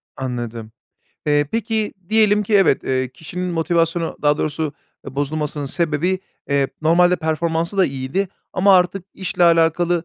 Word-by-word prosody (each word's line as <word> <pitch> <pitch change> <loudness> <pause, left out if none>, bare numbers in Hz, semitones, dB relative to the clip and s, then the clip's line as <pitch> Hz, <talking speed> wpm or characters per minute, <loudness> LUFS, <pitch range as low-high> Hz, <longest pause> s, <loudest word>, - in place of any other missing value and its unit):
Anladım. 120 -3 -5 0.6
Eee, 145 0 +3
peki 220 -1 -1
diyelim 215 -1 +4
ki 210 +1 -1
evet, 195 -9 +4
eee, 130 -1 0
kişinin 160 +8 -6
motivasyonu 165 0 0
daha 145 0 +3
doğrusu 155 0 -2 0.3
bozulmasının 145 +2 -3
sebebi, 170 +4 0 0.3
eee, 140 -1 +2
normalde 175 +3 +4
performansı 165 +2 -1
da 190 - +5
iyiydi 135 +8 -2 0.2
ama 190 +1 +5
artık 180 +1 +1
işle 185 -1 0
alakalı, 170 +1 +3
165 Hz, 130 wpm, -20 LUFS, 145-185 Hz, 0.6 s, da